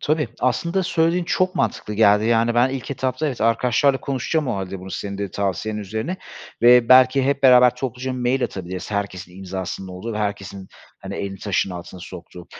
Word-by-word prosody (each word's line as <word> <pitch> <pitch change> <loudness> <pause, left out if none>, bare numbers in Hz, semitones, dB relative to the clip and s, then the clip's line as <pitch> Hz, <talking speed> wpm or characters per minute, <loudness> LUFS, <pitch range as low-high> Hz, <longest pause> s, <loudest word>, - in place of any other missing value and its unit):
Tabii, 150 -4 0
aslında 170 +8 0
söylediğin 170 0 +1
çok 185 +1 0
mantıklı 105 -1 -2
geldi 105 0 +4
yani 115 0 +2
ben 120 +2 +4
ilk 130 -1 -5
etapta 130 +2 -2
evet 135 -5 -4
arkadaşlarla 125 +4 +2
konuşacağım 140 +2 -2
o 115 - -1
hâlde 95 0 -5
bunu 95 +1 -9
senin 100 0 -5
de 100 -2 -3
tavsiyen 100 +3 -2
üzerine 110 - -4 0.5
ve 120 -1 +6
belki 130 +1 +6
hep 140 0 0
beraber 125 -2 +6
topluca 130 0 -4
mail 125 +1 0
atabiliriz, 95 0 -6
herkesin 95 -3 -4
imzasının 95 0 -6
olduğu 95 +5 -6
ve 105 - -4
herkesin 100 -2 -4 0.3
hani - - -7
elini 95 -1 -5
taşın 100 -2 -1
altına 90 +1 -9
soktuğu. 90 0 -11
115 Hz, 175 wpm, -21 LUFS, 95-130 Hz, 0.5 s, ve